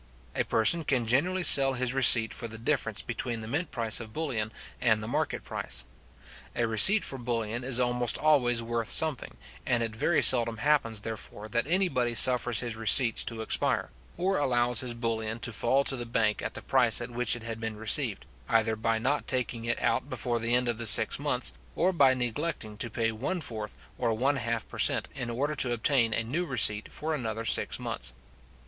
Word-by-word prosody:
A - - -1
person 110 +10 +1
can 130 -5 -1
generally 175 +11 0
sell 135 -5 +7
his 125 -1 -2
receipt 120 -4 +6
for 115 - -5
the 110 0 -9
difference 115 -1 -2
between 120 -1 -5
the 110 - -8
mint 145 +7 -3
price 115 -2 -1
of 110 -2 -10
bullion 120 -9 -3 0.3
and 110 -3 +1
the - - -6
market 120 - -3
price. 65 -2 -4 0.7
A 120 - 0
receipt 115 - +6
for 135 - +3
bullion 115 -1 -4
is 125 -1 +1
almost 125 -1 0
always 125 -6 +1
worth 115 -1 -3
something, 155 -5 +2 0.3
and 120 -2 0
it 115 -1 -5
very 165 +8 +1
seldom 115 -2 +6
happens, 115 -5 0
therefore, 110 -1 -8
that 120 +4 -1
anybody 145 -10 0
suffers 120 0 +4
his 120 -2 -5
receipts 115 +1 +4
to 115 -1 -5
expire, - - -1 0.3
or 190 +1 -1
allows 120 -3 +2
his 125 -2 -3
bullion 115 -1 -3
to 120 - -4
fall 130 +6 +1
to 135 - +2
the 120 -2 -6
bank 110 -3 -1
at - - -6
the - - -8
price 125 -4 +2
at 120 0 -7
which 120 -1 0
it 120 - -9
had 115 0 -6
been 115 -1 -5
received, 110 0 +1 0.2
either 110 -1 +1
by 115 +1 -1
not 130 +6 -2
taking 120 -3 -3
it 120 - -2
out 115 +4 -1
before 120 -4 -3
the 115 +1 0
end 125 0 0
of 120 -2 -3
the 115 - 0
six - - +4
months, - - -1 0.2
or 185 +3 0
by 135 -6 +3
neglecting 125 -2 -4
to 115 - -3
pay 115 +1 -2
one 130 +12 -4
fourth 110 -8 -6 0.2
or 115 - -1
one 135 +5 0
half 115 -2 -3
per - - -10
cent. - - +2
in 130 -3 -6
order 140 +6 -2
to 135 -4 0
obtain 120 0 +1
a 115 - -1
new 145 +10 -3
receipt 110 -8 +1
for 160 +1 -4
another 115 -5 -4
six - - +2
months. - - -4
120 Hz, 200 wpm, -27 LUFS, 115-130 Hz, 0.7 s, sell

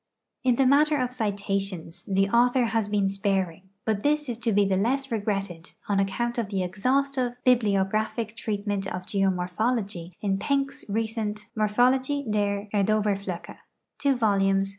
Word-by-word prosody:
In 250 -2 +3
the 270 - +3
matter 295 +3 +4
of 250 0 -1
citations, 195 -6 -2
the 195 0 +2
author 245 +3 +3
has 225 -2 0
been 205 -1 +1
sparing, 195 -2 -1 0.2
but 215 -2 0
this 295 +2 +1
is 230 -1 -3
to 235 -1 0
be 205 0 +4
the 195 -1 +1
less 265 +7 0
regretted 195 -5 -3
on 200 -1 +1
account 235 +5 -1
of 220 -4 -2
the 195 -3 -1
exhaustive 255 +6 0
bibliographic 215 -1 +1
treatment 205 -3 -2
of 180 -1 -5
geomorphology 195 0 -1
in 195 -2 0
I'enck's 275 +2 -1
recent 215 -1 -2
MorphoUxjie 250 +4 +2
der 205 -1 0
Erdoherjldchc 200 -3 0 0.6
vols. 195 -3 +2
210 Hz, 140 wpm, -26 LUFS, 195-240 Hz, 0.6 s, matter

